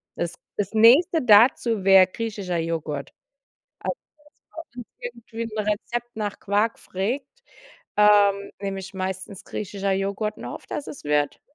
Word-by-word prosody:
Das - - -3 0.2
das 200 -2 -2
Nächste 275 +10 +6
dazu 225 -1 +5
wär 190 -1 +8
griechischer 200 -3 -4
Joghurt. 160 -3 -3 0.7
Also, - - -2 0.8
wenn 245 -1 -8 0.2
bei 245 - -4
uns 235 -1 -18
irgendwie 230 +1 -4
'n - - -5
Rezept 220 +3 -3
nach 205 -2 -3
Quark 210 +3 0
frägt, 235 +9 -3 0.7
ähm, 205 -1 +5
nehme 195 -1 -3
ich 190 +1 -9
meistens 190 +1 -5
griechischer 200 -1 -3
Joghurt, 200 +2 -2
und - - -8
hoffe, - - -8
dass 290 - -4
es 275 - -9
wird. 145 0 0
205 Hz, 145 wpm, -24 LUFS, 190-230 Hz, 0.8 s, wär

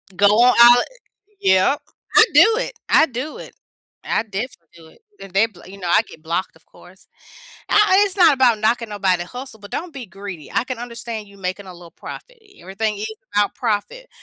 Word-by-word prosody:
Go 205 +2 +4
on 235 +5 +5
out 240 +1 +8 0.6
yep. 190 +9 +3 0.3
I - - +9
do 445 - +6
it. - - -4 0.2
I - - +6
do 260 +4 -6
it. - - -11 0.5
I - - -1
definitely 205 -4 -7
do 165 -1 -16
it, - - -21 0.2
and 195 -2 -12
they 200 +4 +3
bl 200 -6 -20
you 195 +2 -12
know, 180 -2 -4
I - - +5
get 155 - -15
blocked, 170 +3 -3
of - - -23
course. - - -19 0.6
Ah 420 -1 +4
and 395 - +6
it's 395 -1 -5
not 340 -6 +6
about 250 -4 +3
knocking 230 +1 0
nobody 190 -4 0
hustle, 250 +4 -9
but 205 - -12
don't 350 -1 -5
be 270 -3 -8
greedy. 190 -4 -9
I - - 0
can 255 -2 -6
understand 235 -3 -7
you 200 0 -18
making 190 +1 -5
a 185 - -9
little 175 -2 -14
profit - - -11
i 400 -2 -22
everything 210 +3 -3
ain't 215 +2 -4 0.3
about 205 0 +1
profit, 245 - -3
215 Hz, 205 wpm, -20 LUFS, 190-255 Hz, 0.6 s, I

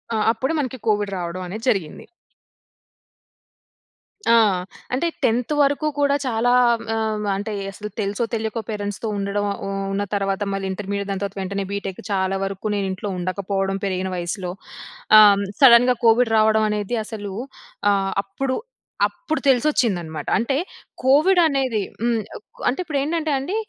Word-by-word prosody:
ఆ! - - +1
అప్పుడు 260 +7 -2
మనకి 260 -2 -3
కోవిడ్ 205 -1 +1
రావడం 175 +1 -4
అనేది 215 +6 -6
జరిగింది. 185 -9 -2 2.3
ఆ! - - +7 0.6
అంటే 305 +7 +1 0.2
10త్ 245 +5 +1
వరకు 285 +2 +2
కూడా 280 0 +3
చాలా 245 0 +2 0.4
ఆహ్, 215 -1 -1
అంటే 205 +3 -4 0.2
అసలు 210 +1 -7
తెలుసో 200 +3 -1
తెలియకో 220 0 -2
పేరెంట్స్‌తో 205 0 -4
ఉండడం 200 +1 -1 0.2
ఉ - - -3 0.2
ఉన్న 200 +1 0
తర్వాత 195 0 -1
మళ్ళీ 195 0 -3
ఇంటర్మీడియట్ 200 +1 -4
దాని 195 0 -3
తర్వాత 200 0 -5
వెంటనే 195 +1 -3
బిటెక్ 195 -2 -4
చాలా 195 0 0
వరకు 195 +2 -3
నేను 200 -1 -1
ఇంట్లో 200 +2 -4
ఉండకపోవడం 195 +1 -2
పెరిగిన 190 -1 -1
వయస్సులో. 175 +1 -3 0.7
ఆహ్, 210 -1 +9
హ్మ్, 200 0 -2 0.2
సడెన్‌గా 250 -1 +7
కోవిడ్ 225 0 +4
రావడం 220 0 +4
అనేది 210 +3 -2
అసలు 205 -3 -6 0.6
ఆహ్, 195 -1 +1
అప్పుడు, 260 +7 -3 0.5
అప్పుడు 335 -2 -4
తెలిసొచ్చిందన్నమాట. 220 - +1
అంటే 235 +4 0 0.5
కోవిడ్ 305 +8 +5
అనేది 265 -7 0 0.2
హ్మ్ 235 0 +2 0.5
అంటే 255 - -2
ఇప్పుడు 310 -5 -3
ఏంటంటే 315 +1 -1
అండి 285 +10 -3
210 Hz, 140 wpm, -22 LUFS, 195-250 Hz, 2.3 s, ఆహ్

